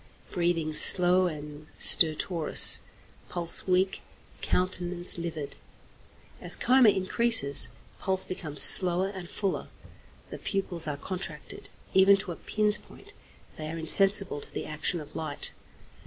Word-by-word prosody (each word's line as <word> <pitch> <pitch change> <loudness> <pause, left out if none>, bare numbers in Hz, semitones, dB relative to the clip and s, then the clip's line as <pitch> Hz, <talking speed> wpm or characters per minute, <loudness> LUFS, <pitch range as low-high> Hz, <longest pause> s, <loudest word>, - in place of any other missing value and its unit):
Breathing 170 -3 -3
slow 180 +3 +6
and 150 -1 -11
stertorous, 160 0 +4 0.5
pulse 175 +1 -1
weak, 185 +1 -2 0.4
countenance 180 -1 -2
livid. 160 -4 -8 0.9
As - - +2
coma 255 -2 +2
increases, 190 - 0 0.3
pulse 190 -1 +1
becomes 155 -6 -4
slower 185 +1 +4
and 190 -3 -11
fuller. 195 -2 -5 0.6
The - - -10
pupils 180 -5 -4
are 145 -1 -6
contracted, 180 -3 -8 0.2
even 195 +1 +3
to 195 -2 -8
a - - -8
pin's 210 +3 -2
point; - - -19 0.5
they 155 - -8
are 165 - -8
insensible 195 0 +4
to - - -4
the - - -8
action 155 +3 -4
of 150 0 -15
light. 155 -3 -6
175 Hz, 125 wpm, -25 LUFS, 155-190 Hz, 0.9 s, slow